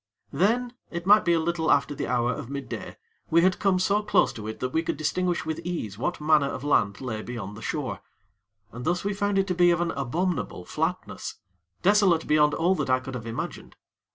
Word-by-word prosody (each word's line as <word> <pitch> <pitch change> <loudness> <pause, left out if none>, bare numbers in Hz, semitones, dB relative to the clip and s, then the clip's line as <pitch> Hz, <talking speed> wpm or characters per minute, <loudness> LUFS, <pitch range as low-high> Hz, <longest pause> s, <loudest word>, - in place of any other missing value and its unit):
Then, 235 - +1 0.2
it 170 0 -5
might 210 +2 +6
be 170 - +3
a 165 - +3
little 165 0 -1
after 140 0 +3
the - - -4
hour 125 0 +1
of 115 - -7
midday, 140 -1 -6 0.3
we 170 +1 +4
had 185 0 +3
come 195 -2 +3
so 200 +3 +2
close 210 0 +2
to 110 -1 -7
it 110 - -6
that 130 0 -3
we 160 - +2
could 165 - -3
distinguish 175 +3 -1
with 160 0 -3
ease 165 - -4
what 175 +11 -2
manner 150 -2 +3
of 130 - -5
land 100 -8 +1
lay 115 -4 -4
beyond 110 -4 -6
the 110 - -10
shore, - - -3 0.7
and 120 +1 -8
thus 175 +4 0
we 205 +1 -1
found 205 0 0
it 195 - +3
to 185 - -1
be 175 0 +4
of 170 -1 +3
an 175 -1 0
abominable 140 - -2
flatness, 160 - -3 0.5
desolate 195 -4 +4
beyond 150 -1 +3
all 175 +3 +2
that 185 - -2
I 130 0 +4
could 130 +1 -8
have 120 -2 -6
imagined. 115 - -6
160 Hz, 215 wpm, -26 LUFS, 130-180 Hz, 0.7 s, might